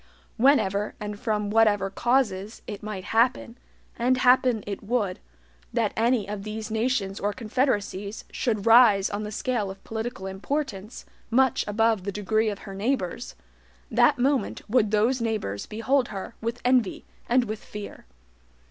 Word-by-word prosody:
Whenever, 210 -6 +2
and 210 -1 -5
from 210 -3 -1
whatever 210 -3 +3
causes, 220 -3 0
it 205 -2 -7
might 210 -3 -5
happen, 230 +2 +1 0.4
and 250 +2 +2
happen 250 -3 +4
it 200 -1 -5
would, 205 -4 -1 0.5
that - - 0
any 230 -1 +2
one 205 - -5
of 200 -1 -6
these 215 +1 -5
nations 220 -4 -1
or 205 - 0
confederacies 210 -4 -2
should 215 -5 -1
rise 225 -4 +6
on 205 +1 -3
the 210 0 -5
scale 225 -2 -1
of 195 0 -10
political 220 -3 -5
importance 210 +1 -4 0.2
much 260 +2 +3
above 220 -1 +2
the 200 - -3
degree 215 +2 0
of 205 - -4
her 195 - -7
neighbors, 195 - -2 0.6
that - - +4
moment 270 +2 0
would 220 -1 +3
those 225 +4 +2
neighbors 215 - -2
behold 245 +4 +1
her 195 +1 -7
with 230 +1 -3
envy 250 -5 +2 0.2
and 245 +1 +3
with 215 -1 -6
fear. 210 - -9
220 Hz, 150 wpm, -26 LUFS, 205-245 Hz, 0.6 s, rise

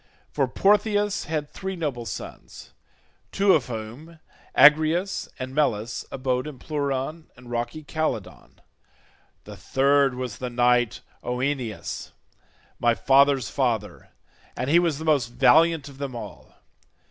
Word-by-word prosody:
For 135 -3 +1
Portheus 205 - +2
had 155 -2 -2
three 190 +4 -6
noble 140 -9 -4
sons, - - -9 0.6
two 195 -1 +4
of 140 -6 +1
whom, 125 +8 -8 0.4
Agrius 160 +6 +4
and 130 0 -6
Melas, 120 -6 -1
abode 130 +1 -1
in 150 -3 -8
Pleuron 145 +2 -3
and 125 -1 -13
rocky 120 +6 -3
Calydon. 155 +1 -4 0.8
The - - -10
third 140 0 +2
was 125 -3 -5
the 125 - -4
knight 120 -1 +2 0.2
Oeneus, 125 -3 -3 0.7
my 120 -1 +3
father's 135 +5 +3
father, 115 -7 -2 0.5
and 130 +3 -1
he 170 - +6
was 170 -5 0
the 160 - -7
most 145 -6 +2
valiant 160 +5 +4
of 140 -1 -13
them 135 -3 -5
all. 115 - -10
140 Hz, 125 wpm, -24 LUFS, 125-155 Hz, 0.8 s, he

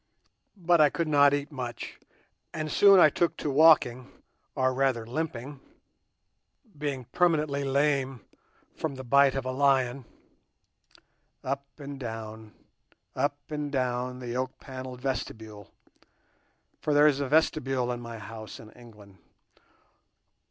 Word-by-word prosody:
But 175 -2 +3
I 150 - +6
could 170 +1 -2
not 145 -2 +5
eat 145 +2 -2
much, 125 -4 -7 0.6
and 155 -1 -3
soon 195 -2 +7
I 155 -4 +7
took 170 +3 0
to 145 - -2
walking, 135 -5 +4 0.4
or 130 0 +1
rather 130 -3 0
limping—being 145 - -8
permanently 155 -5 +1
lame 135 -2 0 0.5
from 155 -4 -4
the 130 - -8
bite 140 +2 +4
of 135 -1 -3
a 130 - -2
lion—up 130 -2 +1 1.7
and 140 -2 -8
down, 110 -2 -7 0.6
up 145 +2 0
and 150 -1 -3
down 125 -1 -2
the 125 -1 -6
oak 130 0 -3
panelled 130 -1 -8
vestibule; 110 -7 -5 1.1
for 150 - -1
there 145 +1 +6
is 145 -2 +4
a 140 - -1
vestibule 135 -4 +1
in 120 0 -5
my 115 -1 -8
house 110 +1 -9
in 110 -1 -13
England. 105 -6 -16
135 Hz, 125 wpm, -27 LUFS, 120-145 Hz, 1.7 s, soon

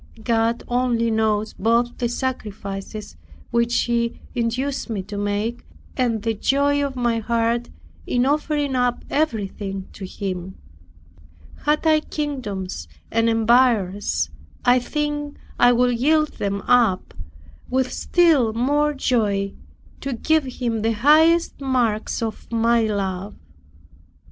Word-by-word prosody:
God 230 +1 +1
only 240 -2 +1
knows 220 -1 +1
both 235 +3 +1
the 240 - 0
sacrifices 210 - -5 0.4
which 235 0 +2
He 235 -1 -1
induced 250 +4 -2
me 205 -4 -2
to 205 +2 -8
make, 205 +4 -2 0.3
and 235 -5 0
the 225 -1 +1
joy 285 +6 +2
of 275 -1 -3
my 240 -2 +1
heart 235 +1 0 0.4
in 245 0 +2
offering 290 -1 0
up 245 -1 0
everything 200 -8 -2
to 200 - -9
Him. 185 -1 -5 1.1
Had 300 +2 +2
I 310 -1 +5
kingdoms 210 - -4 0.2
and 230 0 +2
empires, 220 - +2 0.3
I 250 +1 +5
think 295 +2 -3 0.2
I 245 - +7
would 245 -1 +2
yield 305 +3 +3
them 200 0 -1
up 230 -6 +2 0.6
with 260 0 0
still 310 -11 +3
more 290 +5 +1
joy, 205 -7 0 0.5
to 275 - -3
give 315 +5 +1
Him 240 -3 -2
the 225 +1 +1
higher 305 +8 +6 0.2
marks 240 -5 0
of 225 0 -5
my 230 0 +3
love. 195 -2 -3
235 Hz, 120 wpm, -22 LUFS, 215-265 Hz, 1.1 s, I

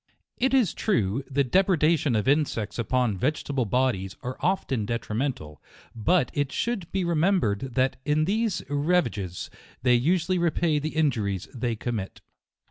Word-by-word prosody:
It 265 +2 +2
is 240 -10 +3
true, 120 - 0
the 140 +1 +2
depredation 160 - +2
of 105 +3 0
insects 135 -7 0
upon 115 -4 0
vegetable 140 0 -1
bodies 105 -5 0
are 125 +1 -4
often 150 - 0
detrimental; 110 - -3 0.3
but 125 +5 +2
it 145 -2 -1
should 230 -8 -2
be 190 -2 0
remembered 155 - +1
that 130 0 +1
in 155 +1 +2
these 215 +1 0
rava 145 0 +1
ges, 95 -4 -6 0.3
they 125 -1 +4
usually 175 +8 +2
repay 165 -2 +1
the 155 +2 -4
injuries 110 - 0
they 120 -2 -2
commit. 110 -4 -4
135 Hz, 140 wpm, -26 LUFS, 115-170 Hz, 0.3 s, they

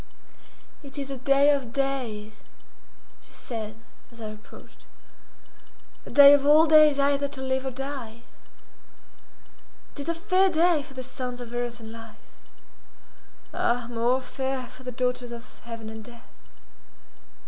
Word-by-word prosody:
"It 280 -1 -13
is 275 -1 -5
a 270 - -5
day 275 +3 +4
of 270 -5 -1
days," 245 -6 -3 0.8
she - - -20
said, 215 -3 -6 0.4
as 235 - -16
I 220 -1 -6
approached; 215 0 -15 1.2
"a - - -8
day 285 0 +9
of 285 -1 +4
all 300 +3 +6
days 305 -2 +6
either 280 0 +2
to 280 -1 -9
live 265 0 -2
or - - 0
die. 260 -3 -7 1.7
It - - -12
is 285 +3 -4
a 335 - 0
fair 380 +2 +2
day 335 -2 +3
for 275 -1 -13
the 260 - -5
sons 250 -1 -5
of 240 -1 -9
earth 240 0 -3
and 220 -1 -10
life—ah, 230 +1 -7
more 240 +3 +1
fair 265 0 -4
for - - -15
the 255 -1 -6
daughters 250 0 -2
of 235 +1 -11
heaven 230 -2 -8
and 220 0 -8
death!" 235 +1 -15
260 Hz, 145 wpm, -26 LUFS, 235-280 Hz, 1.7 s, day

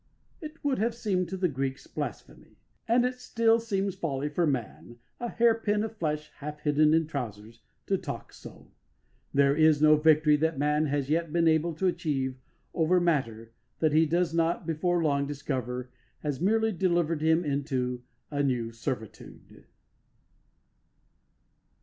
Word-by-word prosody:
It 310 0 -9
would 280 -5 0
have 230 +2 0
seemed 190 -7 -1
to 190 - -4
the 185 -1 +1
Greeks 135 -2 -3
blasphemy, - - -7 0.3
and 240 +2 +3
it 250 0 -3
still 230 -2 +2
seems 200 -4 -2
folly 145 -4 -3
for 165 +3 0
man, 120 -3 -4 0.2
a 240 - -3
hair 235 0 +4
pin 210 -2 0
of 220 0 -5
flesh 150 -4 -3
half 150 +1 -7
hidden 150 +1 +3
in 165 0 +2
trousers, 115 -6 -6 0.2
to - - 0
talk - - -7
so. - - -13 0.6
There 140 0 +3
is 155 -1 +4
no 155 0 +6
victory 155 -1 +4
that 160 +1 0
man 150 +2 +1
has 145 0 -1
yet 165 0 0
been 170 0 +2
able 160 +1 +2
to 190 - -2
achieve 135 -7 -1 0.3
over 175 +2 +3
matter 115 -10 -1 0.3
that 155 -2 +1
he 160 +1 +4
does 170 +1 +1
not 165 +1 0
before 170 +2 0
long 140 -2 +1
discover 130 -3 -4 0.3
has 145 -1 -3
merely 220 +4 +2
delivered 175 -4 0
him 160 +2 +2
into 130 -4 -2 0.3
a 145 -1 0
new 125 -5 0
servitude. 115 -1 -7
155 Hz, 155 wpm, -28 LUFS, 140-180 Hz, 0.6 s, no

